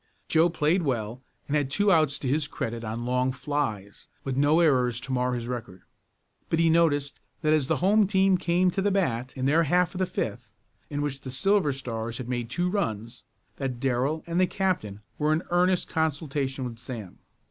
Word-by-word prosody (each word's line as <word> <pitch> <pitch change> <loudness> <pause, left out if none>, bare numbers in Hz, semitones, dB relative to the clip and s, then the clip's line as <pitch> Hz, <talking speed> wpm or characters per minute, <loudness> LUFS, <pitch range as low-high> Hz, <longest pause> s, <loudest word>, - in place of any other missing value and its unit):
Joe 165 +2 +4
played 165 +2 +1
well 120 -5 -2 0.3
and 145 - -1
had 145 -3 +1
two 205 +7 +2
outs 155 -5 +3
to 135 - -5
his 145 +3 +1
credit 115 -2 -4
on 115 +2 -4
long 125 +1 +1
flies, 130 -8 -3 0.2
with 135 -2 -3
no 145 +4 +4
errors 125 -7 +3
to 135 - -7
mar 125 0 +1
his 120 -1 -4
record. 120 -7 -6 0.7
But 165 - +1
he 165 0 +4
noticed 145 -4 +2 0.2
that 155 0 +3
as 150 -4 +2
the - - +2
home 210 +1 +5
team 190 -1 +3
came 180 +1 +2
to 195 - -1
the 205 - +2
bat 130 -11 -1
in 130 - -1
their 155 +5 +4
half 175 +2 +2
of 185 - -5
the 185 - +1
fifth, - - -4 0.4
in 145 0 -2
which 140 -2 -3
the 130 - -7
Silver 185 +4 +2
Stars 115 -4 -4
had 130 - -6
made 120 -2 -3
two 175 +7 0
runs, 120 - -3 0.3
that 130 -3 -3
Darrell 135 +5 0
and 170 +1 -1
the 185 - +4
captain 165 - -2 0.2
were 150 0 +2
in 160 +3 0
earnest 180 +1 +2
consultation 145 -4 -1
with 115 -2 -7
Sam. 115 -6 -8
140 Hz, 200 wpm, -27 LUFS, 125-170 Hz, 0.7 s, home